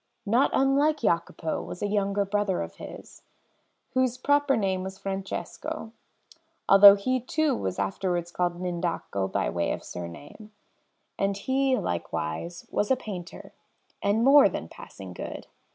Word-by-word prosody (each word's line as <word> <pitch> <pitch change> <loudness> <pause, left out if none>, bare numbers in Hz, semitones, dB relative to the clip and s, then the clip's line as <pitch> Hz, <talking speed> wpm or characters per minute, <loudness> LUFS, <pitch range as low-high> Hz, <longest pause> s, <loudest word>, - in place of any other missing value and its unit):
Not 235 +6 +3
unlike 285 +3 +2
Jacopo 170 -5 -1
was 180 - -7
a - - +1
younger 200 0 0
brother 200 -2 0
of - - -10
his, - - -10 0.7
whose 255 -1 +1
proper 285 +1 +2
name 190 -3 0
was 190 +1 -6
Francesco, 200 +8 -5 0.8
although 200 0 +10
he 255 +6 0
too 290 +3 0
was 95 - -3
afterwards 175 - -2
called 175 -1 -1
L'Indaco 170 - -2
by - - 0
way 85 0 -1
of - - -4
surname; 145 - -9 0.7
and 195 0 0
he, 265 +4 +1
likewise, 85 - -4
was 205 - 0
a 265 - +5
painter, 190 -8 -8 0.5
and 210 +3 +2
more 275 -4 +7
than 80 - -5
passing 95 +2 -11
good. - - -7
200 Hz, 135 wpm, -27 LUFS, 175-255 Hz, 0.8 s, although